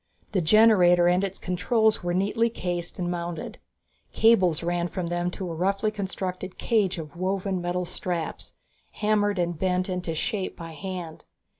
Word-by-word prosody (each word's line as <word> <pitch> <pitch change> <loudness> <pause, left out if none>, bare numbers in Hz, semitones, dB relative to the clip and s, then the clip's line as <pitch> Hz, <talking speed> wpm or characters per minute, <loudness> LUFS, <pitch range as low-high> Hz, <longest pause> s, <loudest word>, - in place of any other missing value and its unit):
The 195 -4 +1
generator 180 -2 +6
and 180 +2 +3
its 195 -1 -2
controls 220 +4 +1
were 175 0 -1
neatly 210 +5 +1
cased 175 -5 -4
and 175 -1 -2
mounted. 170 -2 -5 0.5
Cables 185 -8 +4
ran 175 0 0
from 175 -1 -4
them 175 0 -1
to 180 -1 -5
a - - -4
roughly 195 +5 0
constructed 185 -2 -4
cage 205 -6 +1
of 155 -2 -7
woven 190 +1 -1
metal 175 +1 -1
straps, 170 -2 -4 0.4
hammered 205 -1 +1
and 175 -2 -1
bent 185 0 0
into 180 -3 -3
shape 195 +3 -2
by 165 -2 -8
hand. 175 -1 -6
180 Hz, 155 wpm, -26 LUFS, 175-195 Hz, 0.5 s, generator